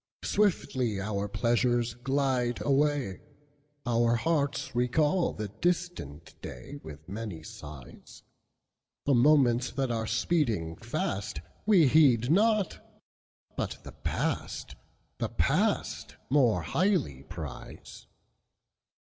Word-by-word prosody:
Swiftly 130 - +1
our 100 0 -2
pleasures 120 +2 +1
glide 125 -1 0
away, 140 -7 +1 0.6
Our 120 -1 +3
hearts 140 +1 0
recall 150 +8 +2
the 105 -1 -5
distant 165 - -2
dayWith 80 - -9
many 100 -4 -6
sighs; 70 -5 -11 0.8
The 140 - +3
moments 125 -2 +4
that 135 -2 -1
are 110 -1 -1
speeding 110 - 0
fastWe 100 - 0
heed 130 -3 +5
not, 210 +1 +3 0.8
but - - -3
the - - -9
past,—the - - -4
past, - - 0 0.2
More 120 - +4
highly 165 - +1
prize. 70 -2 -9
120 Hz, 90 wpm, -29 LUFS, 105-145 Hz, 0.8 s, heed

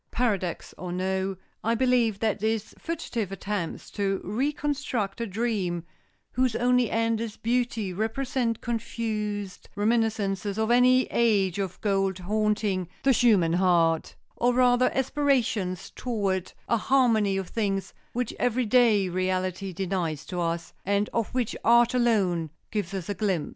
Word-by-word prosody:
Paradox 200 -8 -1
or 180 0 -5
no, 190 +1 -1 0.3
I 230 +1 +2
believe 245 -4 +2
that 220 -2 +1
these 220 0 -1
fugitive 250 - -3
attempts 195 -3 -4
to 195 -1 -1
reconstruct 265 -2 -2
a 230 - -1
dream 195 -5 -1 0.5
whose 255 -2 +1
only 250 -1 +3
end 225 0 +1
is 225 -2 -5
beauty 230 -4 -1
represent 230 +3 -1
confused 215 -4 -3
reminiscences 210 -2 0
of 220 +1 +1
an 245 +1 +6
age 230 -7 +3
of 190 -2 -3
gold 195 -2 +1
haunting 205 -1 0
the 270 - +5
human 210 -10 +4
heart, 170 -3 +2 0.2
or 245 +1 +2
rather 250 0 +4
aspirations 250 -9 0
toward 200 -7 -2
a 235 - +2
harmony 220 -6 +3
of 190 -2 -4
things 195 -4 -2 0.2
which 245 -1 -2
every 245 0 +1
day 220 -4 +4
reality 185 +1 -1
denies 175 -5 -2
to 180 -1 -3
us, 165 -1 -2
and 200 +2 +1
of 230 -2 -1
which 245 -4 0
art 235 +1 +5
alone 200 -10 +2 0.2
gives 200 -3 -2
us 185 -3 -4
a 205 - -1
glimpse." 195 -7 -1
210 Hz, 140 wpm, -27 LUFS, 190-235 Hz, 0.5 s, an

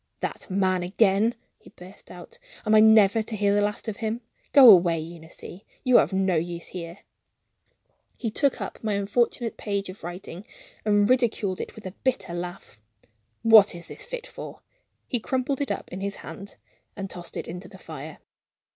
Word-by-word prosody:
"That - - -5
man 185 -1 +1
again!" 200 +4 +2 0.2
he - - -17
burst 180 +2 -15
out. 480 +1 -12 0.3
"Am 215 - +2
I 215 - +8
never 220 -1 +6
to 220 +1 -5
hear 205 -1 +2
the 205 - +3
last 210 +2 -2
of 220 - -4
him? 225 +1 -3 0.3
Go 275 -3 +9
away, 175 -3 +5
Eunice. 160 0 -10 0.4
You 255 -2 +6
are - - +7
of - - -5
no 190 -2 +1
use 170 +1 -4
here." 170 +1 -8 1.2
He 230 -3 -3
took 275 +5 +1
up - - -7
my 215 -1 0
unfortunate 225 +3 0
page 200 -2 -3
of 185 -1 -10
writing 175 +1 -8 0.4
and 205 -1 +3
ridiculed 225 -6 +1
it - - -8
with 220 - -12
a 185 - -5
bitter 195 -9 -1
laugh. 175 - -7 0.6
"What 220 -4 +7
is 170 -1 -9
this - - -8
fit - - -7
for?" - - -10 0.5
He 245 - -1
crumpled 260 +4 -2
it 285 - -1
up - - -4
in 185 - -5
his 200 0 -3
hand 200 +1 -9 0.4
and 195 -1 -5
tossed 175 -2 -8
it - - -5
into 180 +2 -7
the 190 0 -14
fire. 155 -3 -9
200 Hz, 180 wpm, -25 LUFS, 180-220 Hz, 1.2 s, Go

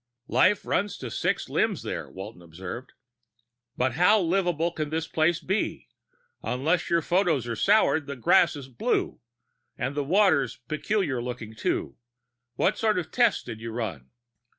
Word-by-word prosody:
"Life 200 +1 +4
runs 200 +1 0
to 125 -3 -6
six - - -1
limbs - - 0
there," - - -4
Walton 95 0 -9
observed. 90 +8 -8 0.8
"But 130 +1 +1
how 180 - +5
livable 175 -2 +1
can 155 -3 -3
this 160 +1 -2
place 165 +2 +2
be? 195 +4 -2 0.5
Unless 155 +8 0
your 170 -1 +2
photos 170 - +1
are 115 - -2
sour, 205 - +4
that 140 -2 -7
grass 125 +4 +4
is 140 -3 -8
blue... 125 -3 -1 0.6
and 135 - -2
the 145 0 -1
water's 180 -2 +3
peculiar 155 - -1
looking, 120 -3 -6
too. 90 -9 -2 0.6
What - - +1
sort 215 -3 +2
of 170 -3 -3
tests 240 -3 +3
did 110 - -8
you 115 - -5
run?" 110 - -5
150 Hz, 150 wpm, -26 LUFS, 120-180 Hz, 0.8 s, how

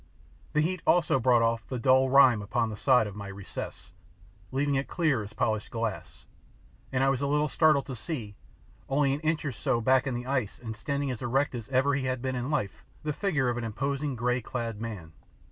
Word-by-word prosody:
The 150 - +3
heat 180 +3 -1
also 165 -6 +4
brought 120 -1 +4
off 115 -1 0
the 130 - -3
dull 130 +1 +4
rime 130 -5 +6
upon 115 +2 -1
the - - -5
side 125 +1 +4
of 105 -2 -7
my 100 -1 -7
recess, 100 0 -7 0.6
leaving 140 +2 0
it 135 0 0
clear 155 -9 +1
as 105 +1 -8
polished 110 -2 -1
glass, 115 -3 -4 0.7
and 130 0 +1
I 135 - +4
was 135 -1 0
a 140 - 0
little 150 +1 +2
startled 155 -2 +3
to 130 - -6
see, 115 -5 -5 0.6
only 140 0 +2
an 140 - -2
inch 155 0 -1
or 145 - -1
so 120 0 0
back 130 +3 +3
in 130 - -1
the 120 +1 -4
ice 130 -6 -1
and 110 -2 -7
standing 140 +4 -2
as 125 - -6
erect 130 +4 +1
as 120 -2 -6
ever 135 +2 +2
he 140 -2 -1
had 130 0 -1
been 130 +1 -2
in 125 +2 -3
life, 100 - -2 0.2
the 150 0 -1
figure 150 -7 0
of 120 0 0
an - - -4
imposing 135 +5 -2
grey 125 +1 0
clad 115 -2 -4
man. 100 -9 -6
130 Hz, 215 wpm, -28 LUFS, 115-140 Hz, 0.7 s, rime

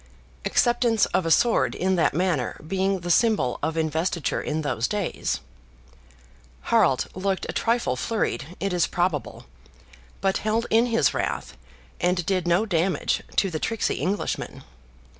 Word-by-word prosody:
(acceptance 240 -2 +3
of 180 - +1
a - - +1
sword 235 +8 +3
in 190 +1 +1
that 165 -4 +2
manner 175 -7 0
being 190 +1 0
the 175 0 -2
symbol 210 - +2
of 160 0 -2
investiture 160 +1 -1
in 155 +1 -2
those 120 -5 -1
days.) 205 - -2 1.3
Harald - - +4
looked 190 0 -2
a - - -4
trifle 230 - +1
flurried, 165 - -2
it 195 -1 -1
is 175 -2 +2
probable; 175 -5 -2 0.7
but 195 0 +1
held 220 +2 0
in 230 +2 +4
his 225 - +2
wrath, - - -3 0.4
and 180 -1 +1
did 185 -2 0
no 175 +5 +3
damage 180 -2 0
to 195 - +2
the 155 - -3
tricksy 225 +6 -1
Englishman. 200 +3 -3
185 Hz, 140 wpm, -25 LUFS, 160-210 Hz, 1.3 s, Harald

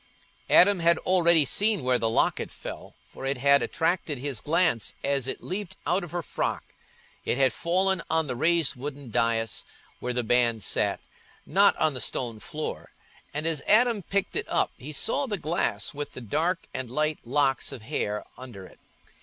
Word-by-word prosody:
Adam 200 +1 +6
had 170 0 +4
already 170 -4 +4
seen 205 - +2
where 125 -1 +2
the 115 - +1
locket 110 - +1
fell, - - -9
for - - -12
it 135 0 -1
had 140 +2 +4
attracted 165 -3 -1
his 135 -2 -3
glance 160 - +1
as 140 -2 0
it - - -5
leaped 195 0 -5
out 180 +3 +1
of 175 - -7
her 175 +1 -3
frock. - - -2 0.6
It - - -1
had 135 -2 +3
fallen 185 +2 +1
on 160 0 +2
the 130 -3 -3
raised 165 +3 +2
wooden 140 -1 -7
dais 115 -1 0 0.4
where 125 - -3
the 125 0 -1
band 115 -2 +2
sat, - - +1 0.4
not 200 +1 +4
on 155 -2 +1
the 125 - -2
stone 115 -4 -1
floor; 155 +7 -6 0.4
and 150 +2 -3
as 160 -3 0
Adam 230 0 +4
picked 195 +2 -2
it - - -3
up, - - +1
he 140 +5 -9
saw 265 - 0
the 210 -4 -2
glass 165 0 -1
with 145 0 -6
the - - -7
dark 160 - -1
and 130 -2 -4
light 150 +4 0
locks 135 +2 0
of 130 -5 -9
hair 105 -5 -3
under 120 -7 -10
it. - - -17
145 Hz, 180 wpm, -26 LUFS, 125-170 Hz, 0.6 s, Adam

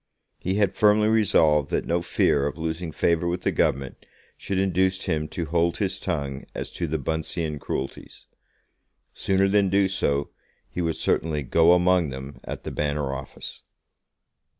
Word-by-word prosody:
He 95 +2 -1
had 100 -2 +2
firmly 105 +1 +4
resolved 80 -9 +3
that - - -1
no 85 +1 0
fear 70 -4 +2
of 75 - -5
losing 80 +1 -3
favour 85 +2 +1
with 90 +1 -1
the - - +1
Government 70 -1 -1 0.3
should 100 - -4
induce 95 0 +1
him 75 -1 -1
to 85 +1 -4
hold 85 +2 +1
his 95 -2 -1
tongue 70 -6 -3
as - - -5
to 85 - -3
the 80 +1 -1
Buncean 80 +1 -3
cruelties. 70 0 -6 0.9
Sooner 95 0 +1
than 100 -1 +3
do 100 +1 +3
so 70 -7 -1 0.4
he 90 - -3
would 80 -2 0
certainly 75 -3 0
"go 85 +6 +5
among 90 -2 +3
them" 65 +1 -8
at - - -6
the - - -5
Banner 75 -2 -1
office. 70 0 -8
85 Hz, 160 wpm, -25 LUFS, 75-95 Hz, 0.9 s, go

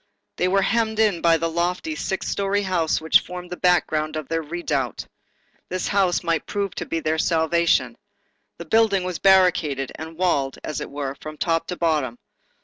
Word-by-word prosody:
They 180 - +1
were 195 +1 +2
hemmed 220 0 0
in 210 -6 +2
by 165 -1 +4
the 165 +1 -1
lofty, 175 - -1
six 190 -10 -3
story 200 0 0
house 175 -4 0
which 160 0 +5
formed 180 0 -9
the - - -3
background 160 -4 +1
of 155 -3 -4
their 165 0 -1
redoubt. 150 -6 -3 0.6
This 185 0 -2
house 195 -4 +2
might 165 -3 -1
prove 200 -2 -2
their 160 -1 -2
salvation. 170 +1 +2 0.6
The - - -8
building 220 -4 +3
was 180 -2 -4
barricaded, 175 -8 +3
and 160 +1 -9
walled, 145 -7 0
as 155 - -4
it - - -5
were, 140 -1 -4
from 155 0 -8
top 165 0 0
to 180 - -3
bottom. 150 -8 0
170 Hz, 170 wpm, -23 LUFS, 155-185 Hz, 0.6 s, which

